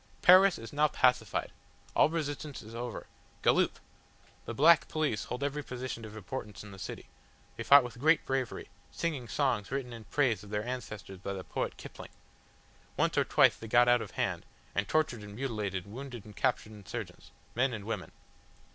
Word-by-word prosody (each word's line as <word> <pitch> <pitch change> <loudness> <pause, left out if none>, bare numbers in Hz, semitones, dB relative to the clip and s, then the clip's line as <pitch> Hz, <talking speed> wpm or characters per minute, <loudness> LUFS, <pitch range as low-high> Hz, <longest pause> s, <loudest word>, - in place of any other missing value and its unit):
"Paris 185 +1 +8
is 115 +4 -9
now 150 +1 +4
pacified. 125 -3 +1 0.4
All - - +5
resistance 150 -4 -4
is 110 +1 -11
over. 120 0 -5 0.4
Galloop! - - +3 0.7
The - - -4
black 170 +7 +6
police 150 -9 -1
hold 125 +3 -4
every 145 +1 -1
position 125 -3 -5
of 110 0 -9
importance 105 +1 -6
in 105 - -11
the 95 - -11
city. - - -6 0.5
They - - -7
fought 140 -1 +8
with 120 -1 -8
great 155 +4 +4
bravery, 135 -2 -2 0.2
singing 150 -8 -3
songs 125 -8 0
written 130 -2 -3
in 115 -2 -9
praise 115 -6 +1
of 105 - -12
their 105 +1 -2
ancestors 105 -6 -6
by 100 +1 -4
the 95 -1 -6
poet - - -3
Kipling. - - -10 0.9
Once - - +2
or - - +4
twice - - +5
they 115 - -9
got 120 +2 +5
out 120 -1 +5
of - - -6
hand, - - -1 0.3
and 100 0 0
tortured 140 -6 +1
and 105 0 -9
mutilated 105 -7 -3
wounded 120 +1 -8
and 105 - -12
captured 125 -4 0
insurgents, 105 -4 -8 0.2
men 130 +3 +2
and 105 -4 -6
women. 110 -4 -4
120 Hz, 180 wpm, -31 LUFS, 105-140 Hz, 0.9 s, Paris